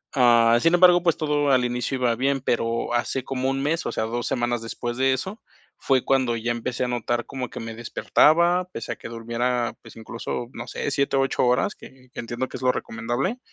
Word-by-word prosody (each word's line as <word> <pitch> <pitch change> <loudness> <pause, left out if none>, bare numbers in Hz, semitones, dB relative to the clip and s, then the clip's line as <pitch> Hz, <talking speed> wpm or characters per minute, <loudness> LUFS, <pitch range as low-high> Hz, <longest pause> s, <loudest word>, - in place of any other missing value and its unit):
Ah, 120 -2 +5
sin 165 - +3
embargo, 175 -1 +6
pues 170 -3 +2
todo 145 -2 +1
al 125 -2 +3
inicio 125 +2 -2
iba 120 -2 +1
bien, 135 +2 0
pero 115 -1 -1
hace 120 +2 -1
como 130 -1 -2
1 135 0 -1
mes, 160 +3 -1
o - - -2
sea, 110 - -2
2 120 +1 -3
semanas 120 -1 -1
después 120 +1 -5
de 130 0 +3
eso, 190 - -4 0.4
fue 130 -2 +1
cuando 130 -3 +1
ya 115 +1 -3
empecé 120 +1 -3
a - - 0
notar 120 0 -2
como 130 -3 -5
que - - -7
me 115 0 -6
despertaba, 170 +9 +3
pese 115 - -5
a - - -3
que - - -9
durmiera, 120 0 -2
pues - - -14
incluso, 115 +1 -5
no 120 - -7
sé, 145 - -3
7 140 0 0
u - - +4
8 135 -1 +1
horas 125 +11 +1
que 130 -1 -16
que - - -9
entiendo 120 +2 -3
que - - -7
es 130 - -10
lo 125 - +4
recomendable, 120 - -3
125 Hz, 220 wpm, -24 LUFS, 120-135 Hz, 0.4 s, embargo